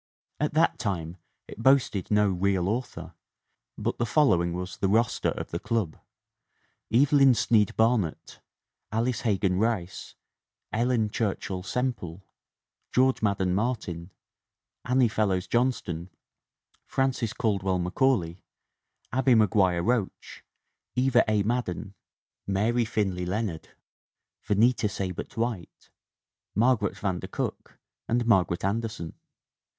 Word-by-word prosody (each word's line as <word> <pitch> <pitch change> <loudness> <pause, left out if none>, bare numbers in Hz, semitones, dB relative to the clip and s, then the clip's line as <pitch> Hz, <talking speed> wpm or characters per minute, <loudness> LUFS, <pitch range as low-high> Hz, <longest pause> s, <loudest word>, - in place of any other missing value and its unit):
At 150 0 -1
that 160 - +3
time 90 -5 -3 0.3
it - - -9
boasted 125 -7 +3
no 105 -1 +3
'real 95 0 0
author,' 95 -7 -4 0.6
but - - -3
the 120 - +1
following 90 - +3
was 90 +1 -5
the 95 - 0
roster 115 +4 +2
of - - -5
the 85 - -2
club: 110 -9 -1 1.0
Evelyn 135 +1 +5
Snead 110 -3 +2
Barnett, 110 -7 0 0.5
Alice 115 +2 0
He 105 -5 +1
gan 90 0 0
Rice, 100 -5 -2 0.6
Ellen 115 -2 +1
Churchill 100 -4 -2
Semple, 95 -5 -3 0.7
George 130 +1 +3
Madden 100 -4 +1
Martin, 100 -6 -2 0.8
Annie 125 0 +3
Fellows 100 -4 0
Johnston, 105 -9 -1 0.8
Frances 130 -4 0
Caldwell 95 -4 0
Macaulay, 90 -1 0 0.7
Abbie 130 -1 +4
Meguire 95 -5 +3
Roach, 115 -4 -2 0.5
Eva 125 -1 +4
A. 105 -2 +2
Madden, 110 -3 -2 0.5
Mary 110 +5 +1
Finley 95 -5 -1
Leonard, 95 -4 -3 0.7
Venita 110 +1 +2
Seibert 95 +2 -5
White, 115 -7 -4 0.6
Mar 125 +4 +4
garet 105 -3 -3
van 95 -3 -2
der - - -7
Cook - - -5 0.3
and 120 +1 +1
Margaret 95 -6 +2
Anderson. 105 -5 -3
105 Hz, 115 wpm, -27 LUFS, 95-120 Hz, 1.0 s, Evelyn